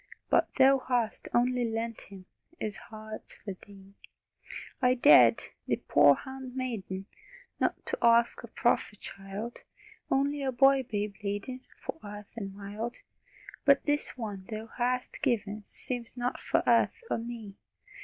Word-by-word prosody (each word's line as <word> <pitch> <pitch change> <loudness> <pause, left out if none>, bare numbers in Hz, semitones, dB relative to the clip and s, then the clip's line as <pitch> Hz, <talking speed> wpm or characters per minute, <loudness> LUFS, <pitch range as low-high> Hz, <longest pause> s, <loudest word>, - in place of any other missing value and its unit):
But - - +4
Thou 270 0 +6
hast 245 -4 -1
only 250 +1 +2
lent 230 0 -2
Him, 190 -2 -11 0.3
His 215 -1 -3
heart's 215 0 -9
for 200 - -7
Thee! 195 +1 -16 0.9
I 250 0 +4
dared 285 +4 +7 0.2
Thy - - +1
poor - - +7
hand 265 -2 -8
maiden 210 -7 -4 0.5
Not 470 - -1
ask 235 0 +4
a 235 - -9
prophet 220 -2 0
child: 195 +4 -7 0.5
Only 280 +2 +1
a 270 -1 0
boy 270 +2 +5
babe 205 -1 -2
laden 205 +6 -3 0.2
For - - -4
earth 205 0 -9
and 200 -4 -5
mild. 210 +4 -5 0.7
But 280 -1 +5
this 290 -3 0
one 205 -5 -6
Thou 215 0 -5
hast 250 +2 -1
given 215 -6 0
Seems 245 -1 -5
not 245 +1 -2
for - - +1
earth - - +3
or - - +1
me! 230 -3 -7
235 Hz, 140 wpm, -30 LUFS, 205-255 Hz, 0.9 s, dared